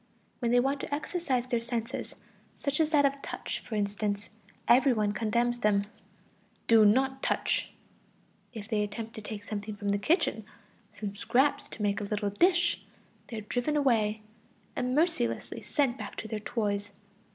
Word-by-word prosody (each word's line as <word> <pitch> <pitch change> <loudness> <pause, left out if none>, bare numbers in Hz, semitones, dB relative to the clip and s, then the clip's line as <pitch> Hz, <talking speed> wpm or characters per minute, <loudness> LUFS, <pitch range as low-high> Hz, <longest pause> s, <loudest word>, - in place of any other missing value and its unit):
When 235 - 0
they 245 +1 +5
want 275 +3 +1
to - - -6
exercise 285 -4 -1
their 240 -2 0
senses, 235 +1 -4 0.4
such 280 +1 -1
as 315 -1 +3
that 295 -3 +4
of 275 0 0
touch, - - -4
for 225 - -6
instance, 205 0 -1 0.4
every 260 +2 +6
one 210 -2 +1
condemns 235 +3 0
them: 210 -3 +3 0.8
"Do 225 -2 +7
not 265 +5 +3
touch!" - - 0 0.8
If 220 -4 -8
they 215 -2 +1
attempt 220 +2 -4
to 220 - -7
take 210 -1 -6
something 210 0 -5
from 205 0 -3
the 200 0 +2
kitchen, 225 - +1 0.5
some 205 -2 -5
scraps 265 +7 +2
to 210 - -6
make 205 0 +1
a - - -2
little 205 0 -1
dish, 350 - +3 0.5
they 230 - -6
are - - -3
driven 245 +7 -1
away, 220 -6 +2 0.5
and 250 +1 0
mercilessly 315 -6 0
sent 270 -4 0
back - - -6
to 220 - -5
their 220 0 -3
toys. 205 -2 -2
230 Hz, 165 wpm, -30 LUFS, 210-265 Hz, 0.8 s, Do